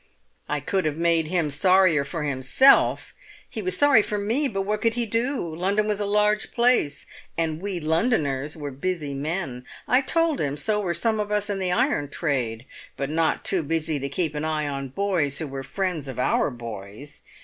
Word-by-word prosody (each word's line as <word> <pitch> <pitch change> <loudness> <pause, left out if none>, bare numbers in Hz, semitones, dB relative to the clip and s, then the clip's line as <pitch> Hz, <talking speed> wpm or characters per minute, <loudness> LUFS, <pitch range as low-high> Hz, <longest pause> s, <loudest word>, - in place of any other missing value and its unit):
I 150 -1 -1
could 190 +5 -1
have 155 -1 -1
made 165 -1 +2
him 165 -3 0
sorrier 180 0 +4
for 150 +3 -4
himself! 140 - +3 0.3
He 225 - -6
was 185 -2 -1
sorry 285 -6 +6
for 210 0 -2
me, 230 +9 +1
but 195 -6 -2
what 210 +2 -2
could 230 -1 +1
he 240 -1 0
do? 230 - -1
London 200 +5 0
was 210 -1 -1
a 205 - -1
large 210 +1 +1
place, 235 - +2 0.3
and 160 -1 -1
'we 195 -2 -2
Londoners' 155 - 0
were 145 -2 -5
busy 150 +1 -3
men. 140 -3 -3 0.2
I 250 +3 +4
told 330 +2 +1
him 145 -1 -2
so 210 +6 0
were 175 -4 -1
some 220 +5 0
of 210 0 -2
us 210 0 0
in 195 - -2
the 185 -1 0
iron 145 -4 +1
trade, 130 -7 -2 0.3
but 140 +1 -3
not 160 0 0
too 190 - +2
busy 160 0 -1
to 140 +1 -3
keep 155 +2 -1
an 150 0 -3
eye 155 -1 -1
on 140 -1 -4
boys 165 -3 0
who 160 - -1
were 135 -2 -6
friends 180 -1 -3
of 130 - -7
our 125 - +1
boys. 115 +1 -9
165 Hz, 195 wpm, -24 LUFS, 145-205 Hz, 0.3 s, sorry